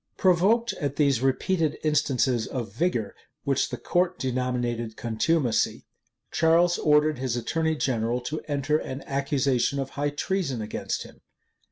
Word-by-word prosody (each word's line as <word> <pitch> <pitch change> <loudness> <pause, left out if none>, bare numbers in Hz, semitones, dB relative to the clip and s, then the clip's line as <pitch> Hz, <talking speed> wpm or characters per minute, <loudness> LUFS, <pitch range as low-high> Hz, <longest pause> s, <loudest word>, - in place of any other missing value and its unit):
Provoked 200 +6 +3
at 140 -1 -1
these 140 -5 +2
repeated 155 +5 +1
instances 135 -6 +1
of 120 -7 -5
vigor, 120 - -1 0.3
which - - +1
the - - -4
court 180 +1 0
denominated 120 -3 -2
contumacy, 120 +3 0 0.5
Charles 170 +2 +3
ordered 150 -1 +3
his 130 -2 -1
attorney 160 +6 0
general 120 -4 0
to 155 +5 -4
enter 145 +1 +1
an 130 +1 -6
accusation 140 -1 0
of 135 -1 -3
high 145 +1 -1
treason 145 -3 -2
against 105 -1 -3
him. - - -15
140 Hz, 135 wpm, -26 LUFS, 125-160 Hz, 0.5 s, Provoked